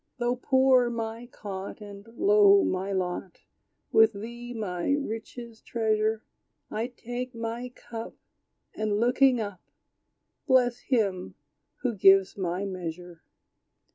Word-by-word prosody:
Though 240 0 0
poor 260 -1 +4
my 230 0 -5
cot, 195 -5 -7
And 205 0 -11
low 405 -1 +6
my 190 +2 -1
lot, 185 -1 -3 0.5
With 220 0 +6
thee, 235 +4 -8
my 205 -1 -2
richest 235 -3 -5
treasure, 220 -1 0 0.5
I 220 +2 -2
take 245 0 -6
my 230 +2 -4
cup, 230 -2 -9 0.6
And 215 -1 -1
looking 250 +2 +4
up, 205 -5 -5 0.9
Bless 245 -2 +3
Him 195 - -1 0.5
who 250 -2 +1
gives 195 -1 +5
my 185 0 -2
measure. 175 -2 -6
225 Hz, 110 wpm, -27 LUFS, 195-245 Hz, 0.9 s, low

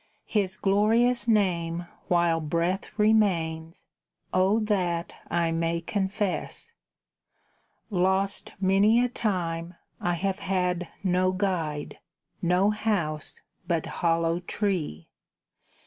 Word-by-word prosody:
His 195 -4 -1
glorious 225 +5 +3
name 175 -6 +1 0.2
while 170 -2 +3
breath 170 +4 -1
remains, 170 -7 +1 0.5
O 190 +4 +3
that 180 -5 -1 0.2
I 170 -1 +1
may 165 0 0
confess. 200 - -2 1.2
Lost 190 +1 0
many 200 +4 +4
a 250 - +3
time, 175 -7 -2 0.2
I 175 0 0
have 190 +2 -1
had 180 -2 -1 0.2
no 185 0 +2
guide, 180 -6 -2 0.4
No 180 +4 +3
house, 185 -9 -1 0.3
but 170 -3 0 0.2
hollow 165 0 +2
tree! 175 - -2
185 Hz, 95 wpm, -27 LUFS, 170-200 Hz, 1.2 s, many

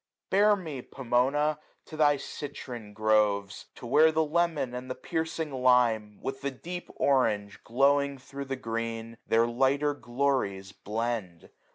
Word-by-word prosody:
Bear 205 +2 +5
me, 160 -9 -6
Pomona! 135 +5 0 0.3
to 155 - -10
thy 145 -2 +4
citron 125 -7 -7
groves; 105 -2 +1
To - - -10
where 155 +6 +5
the 160 0 +2
lemon 160 -4 0
and 125 +1 -6
the 130 - -3
piercing 160 -2 -3
lime, 125 -5 +2
With 135 0 -4
the 140 - -1
deep 175 +7 -7
orange, 105 -7 +1
glowing 140 +3 +2
thro* 140 +1 -8
the 135 -1 -4
green, 115 -2 -4
66^ 115 - -15
Their 115 +1 +4
lighter 135 +5 +1
glories 120 -7 -1
blend. 110 -5 -4
130 Hz, 145 wpm, -28 LUFS, 115-145 Hz, 0.3 s, Bear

